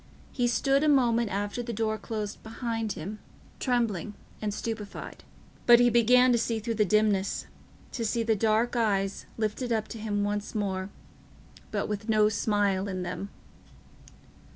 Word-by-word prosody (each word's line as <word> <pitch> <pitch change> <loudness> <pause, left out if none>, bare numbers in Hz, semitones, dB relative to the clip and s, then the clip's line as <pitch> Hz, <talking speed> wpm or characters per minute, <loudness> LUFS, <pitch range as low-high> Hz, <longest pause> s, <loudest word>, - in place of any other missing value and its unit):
He 245 -2 +1
stood 275 +4 +2
a 305 - +4
moment 235 -5 +3
after 205 +4 -2
the 240 0 -4
door 220 0 -1
closed 215 0 -5
behind 225 -1 -3
him, 200 +7 -6 0.4
trembling 225 -5 0 0.3
and 215 -1 -1
stupefied. 215 -1 -6 0.4
But 240 -1 +9
he 245 0 +5
began 250 +2 +5
to 235 - +3
see 230 0 0
through 225 +2 -2
the - - +5
dimness—to 210 +3 -1
see 230 +1 0
the 225 -1 +2
dark 220 +3 +1
eyes 200 -4 0
lifted 225 +3 -2
up 220 -2 0
to 225 - -7
him 205 -1 -1
once 205 +1 -3
more, 190 -2 -2 0.8
but - - -2
with 210 +1 -4
no 215 -1 +4
smile 205 -2 +1
in 185 -2 -3
them. 180 +2 -5
215 Hz, 155 wpm, -28 LUFS, 205-235 Hz, 0.8 s, But